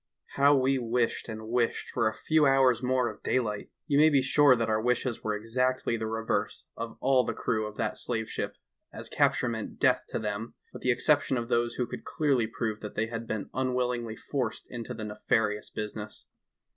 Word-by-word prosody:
How 140 Hz, +1 st, +4 dB
we 135 Hz, 0 st, +2 dB
wished 120 Hz, 0 st, 0 dB
and 110 Hz, 0 st, -6 dB
wished 120 Hz, 0 st, 0 dB
for -, -, +1 dB
a 110 Hz, -, 0 dB
few 155 Hz, +4 st, +3 dB
hours 130 Hz, -3 st, +4 dB
more 130 Hz, -1 st, +1 dB
of -, -, -7 dB
daylight! 105 Hz, -5 st, -1 dB, 0.2 s
You 145 Hz, -2 st, +2 dB
may 155 Hz, +1 st, +7 dB
be 140 Hz, -3 st, +3 dB
sure 145 Hz, 0 st, +5 dB
that 115 Hz, -1 st, -1 dB
our 110 Hz, 0 st, +1 dB
wishes 125 Hz, 0 st, 0 dB
were 105 Hz, -1 st, 0 dB
exactly 125 Hz, +3 st, 0 dB
the 110 Hz, -1 st, -3 dB
reverse 110 Hz, 0 st, -2 dB
of 115 Hz, 0 st, -6 dB
all 130 Hz, -1 st, +4 dB
the 115 Hz, -1 st, -3 dB
crew 110 Hz, -1 st, -1 dB
of 105 Hz, -, -10 dB
that -, -, -2 dB
slave 110 Hz, -1 st, -2 dB
ship, -, -, -4 dB, 0.4 s
as -, -, -8 dB
capture 130 Hz, -, +2 dB
meant 115 Hz, -2 st, -4 dB
death -, -, +3 dB
to -, -, -3 dB
them, 105 Hz, +2 st, -4 dB, 0.2 s
with -, -, -9 dB
the 130 Hz, -, 0 dB
exception 140 Hz, +1 st, +3 dB
of 120 Hz, 0 st, -3 dB
those 120 Hz, 0 st, +1 dB
who 125 Hz, -, 0 dB
could -, -, -7 dB
clearly 135 Hz, -7 st, +1 dB
prove 110 Hz, -1 st, -3 dB
that 105 Hz, -, -8 dB
they 110 Hz, -, +1 dB
had 115 Hz, 0 st, -5 dB
been 110 Hz, -3 st, -4 dB
unwillingly 125 Hz, -3 st, -1 dB
forced 125 Hz, -4 st, -3 dB
into 120 Hz, -2 st, -5 dB
the 110 Hz, -, -6 dB
nefarious 105 Hz, 0 st, 0 dB
business. 105 Hz, 0 st, -6 dB
120 Hz, 200 wpm, -29 LUFS, 110-130 Hz, 0.4 s, may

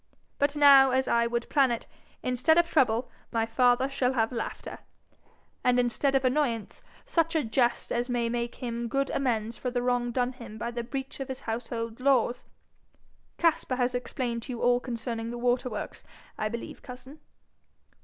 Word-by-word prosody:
But 285 Hz, +1 st, +1 dB
now, 280 Hz, -2 st, +8 dB
as 260 Hz, +1 st, +1 dB
I 235 Hz, 0 st, +3 dB
would 235 Hz, 0 st, -2 dB
plan 275 Hz, -3 st, +3 dB
it, 235 Hz, -1 st, -3 dB, 0.4 s
instead 255 Hz, +6 st, +2 dB
of 345 Hz, 0 st, +4 dB
trouble 250 Hz, -6 st, +2 dB, 0.2 s
my 225 Hz, -1 st, +1 dB
father 245 Hz, +2 st, +3 dB
shall 265 Hz, -2 st, 0 dB
have 225 Hz, -2 st, +1 dB
laughter, 235 Hz, -2 st, -5 dB, 0.8 s
and 250 Hz, 0 st, +3 dB
instead 245 Hz, +3 st, +1 dB
of 265 Hz, -1 st, +2 dB
annoyance 255 Hz, -5 st, 0 dB, 0.2 s
such 330 Hz, 0 st, +1 dB
a 315 Hz, -, +2 dB
jest 240 Hz, +1 st, 0 dB
as 240 Hz, +1 st, -1 dB
may 240 Hz, -1 st, 0 dB
make 235 Hz, 0 st, -2 dB
him 235 Hz, -1 st, -4 dB
good 275 Hz, +3 st, -1 dB
amends 230 Hz, -4 st, -1 dB
for 250 Hz, -, -2 dB
the 245 Hz, 0 st, -2 dB
wrong 245 Hz, -1 st, +1 dB
done 250 Hz, +1 st, 0 dB
him 235 Hz, -4 st, -10 dB
by 235 Hz, +2 st, -3 dB
the 240 Hz, 0 st, -4 dB
breach 270 Hz, +3 st, -6 dB
of 270 Hz, -, -4 dB
his 260 Hz, -1 st, -6 dB
household 230 Hz, 0 st, -4 dB
laws. 255 Hz, -2 st, +2 dB, 0.9 s
Caspar 325 Hz, -6 st, +1 dB
has 250 Hz, 0 st, 0 dB
explained 245 Hz, -1 st, -3 dB
to 250 Hz, -, -6 dB
you 235 Hz, -, -6 dB
all 245 Hz, 0 st, +4 dB
concerning 230 Hz, -2 st, -4 dB
the 240 Hz, -, -5 dB
water 245 Hz, +1 st, +1 dB
works, 215 Hz, -, -6 dB, 0.3 s
I 215 Hz, -, -2 dB
believe, 235 Hz, +1 st, -7 dB
cousin?' 260 Hz, +4 st, -11 dB
245 Hz, 175 wpm, -28 LUFS, 235-265 Hz, 0.9 s, now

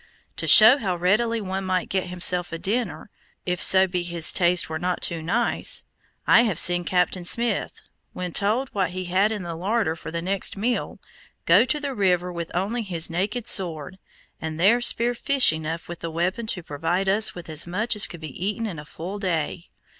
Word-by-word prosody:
To -, -, -3 dB
show 225 Hz, +6 st, +8 dB
how 190 Hz, -6 st, -2 dB
readily 215 Hz, +7 st, 0 dB
one 190 Hz, 0 st, -4 dB
might 185 Hz, -1 st, -2 dB
get 190 Hz, -1 st, -2 dB
himself 180 Hz, 0 st, +1 dB
a 165 Hz, -, -5 dB
dinner, 215 Hz, +4 st, -3 dB, 0.3 s
if 180 Hz, 0 st, -3 dB
so 190 Hz, 0 st, +6 dB
be 180 Hz, -1 st, -3 dB
his 170 Hz, -2 st, +3 dB
taste 175 Hz, -1 st, +2 dB
were 160 Hz, 0 st, -5 dB
not 180 Hz, +1 st, -2 dB
too 170 Hz, -1 st, -1 dB
nice, 225 Hz, +9 st, -1 dB, 0.4 s
I -, -, +5 dB
have 215 Hz, -9 st, -1 dB
seen 175 Hz, 0 st, +4 dB
Captain 180 Hz, 0 st, -1 dB
Smith, 235 Hz, +7 st, 0 dB, 0.3 s
when 180 Hz, -1 st, -6 dB
told 225 Hz, +6 st, 0 dB
what 190 Hz, -3 st, -2 dB
we 185 Hz, 0 st, -5 dB
had 185 Hz, +4 st, 0 dB
in 210 Hz, -4 st, -4 dB
the 170 Hz, -1 st, -6 dB
larder 190 Hz, 0 st, -2 dB
for 160 Hz, -, -10 dB
the 170 Hz, +1 st, -4 dB
next 195 Hz, +2 st, 0 dB
meal, 235 Hz, +4 st, -3 dB, 0.5 s
go -, -, +5 dB
to 300 Hz, +3 st, 0 dB
the 285 Hz, -2 st, -5 dB
river 180 Hz, -4 st, 0 dB
with 170 Hz, -1 st, -6 dB
only 205 Hz, +7 st, -2 dB
his 175 Hz, -6 st, -1 dB
naked 205 Hz, +7 st, -3 dB
sword, 175 Hz, -1 st, -1 dB, 0.4 s
and 160 Hz, 0 st, -6 dB
there 220 Hz, +7 st, +3 dB
spear 240 Hz, 0 st, +3 dB
fish 255 Hz, -, +3 dB
enough 160 Hz, +1 st, -6 dB
with 175 Hz, 0 st, -8 dB
the 165 Hz, -, -6 dB
weapon 180 Hz, +7 st, -3 dB
to 180 Hz, -5 st, -3 dB
provide 165 Hz, +6 st, -3 dB
us 210 Hz, +3 st, +2 dB
with 175 Hz, -2 st, -10 dB
as 155 Hz, +1 st, 0 dB
much 215 Hz, +7 st, -1 dB
as 210 Hz, -, +3 dB
could 170 Hz, -, -12 dB
be 155 Hz, +2 st, -8 dB
eaten 210 Hz, +3 st, -3 dB
in 180 Hz, -8 st, -6 dB
a 150 Hz, -, -11 dB
full 180 Hz, +6 st, -8 dB
day. 170 Hz, -3 st, -3 dB
185 Hz, 200 wpm, -23 LUFS, 170-215 Hz, 0.5 s, show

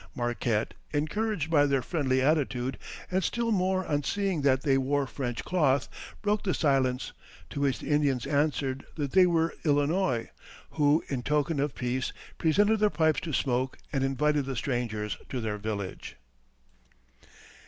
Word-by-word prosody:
Marquette, 120 Hz, -2 st, -1 dB, 0.2 s
encouraged 165 Hz, +2 st, -1 dB
by 145 Hz, -3 st, +5 dB
their 135 Hz, -2 st, +1 dB
friendly 130 Hz, -6 st, 0 dB
attitude, 135 Hz, -4 st, 0 dB, 0.3 s
and 190 Hz, +1 st, +1 dB
still 235 Hz, +3 st, 0 dB
more 185 Hz, -2 st, +1 dB
on 145 Hz, -1 st, 0 dB
seeing 195 Hz, 0 st, -1 dB
that 130 Hz, -2 st, +2 dB
they 140 Hz, -3 st, +3 dB
wore 140 Hz, +1 st, +1 dB
French 125 Hz, -3 st, -4 dB
cloth, 140 Hz, -7 st, +2 dB, 0.4 s
broke 210 Hz, 0 st, +1 dB
the 185 Hz, -, 0 dB
silence; 135 Hz, -4 st, +1 dB, 0.4 s
to -, -, -4 dB
which 135 Hz, -3 st, +2 dB
the -, -, -9 dB
Indians 140 Hz, -4 st, +2 dB
answered 140 Hz, -2 st, 0 dB
that 145 Hz, -4 st, -3 dB
they 185 Hz, -1 st, +6 dB
were 165 Hz, -1 st, +1 dB
Illinois, 145 Hz, -3 st, +1 dB, 0.4 s
who, 150 Hz, +1 st, +3 dB
in 135 Hz, -3 st, -2 dB
token 150 Hz, +3 st, 0 dB
of 145 Hz, 0 st, -1 dB
peace, 125 Hz, +1 st, -2 dB, 0.3 s
presented 205 Hz, +7 st, +3 dB
their 210 Hz, 0 st, +4 dB
pipes 160 Hz, -4 st, +2 dB
to 165 Hz, -, -5 dB
smoke 130 Hz, -1 st, 0 dB, 0.2 s
and 135 Hz, -1 st, +1 dB
invited 145 Hz, +2 st, +1 dB
the 135 Hz, -1 st, -4 dB
strangers 115 Hz, -4 st, -2 dB
to 130 Hz, -, -3 dB
their 105 Hz, -2 st, -3 dB
village. 100 Hz, -3 st, -5 dB
145 Hz, 155 wpm, -28 LUFS, 130-160 Hz, 0.4 s, they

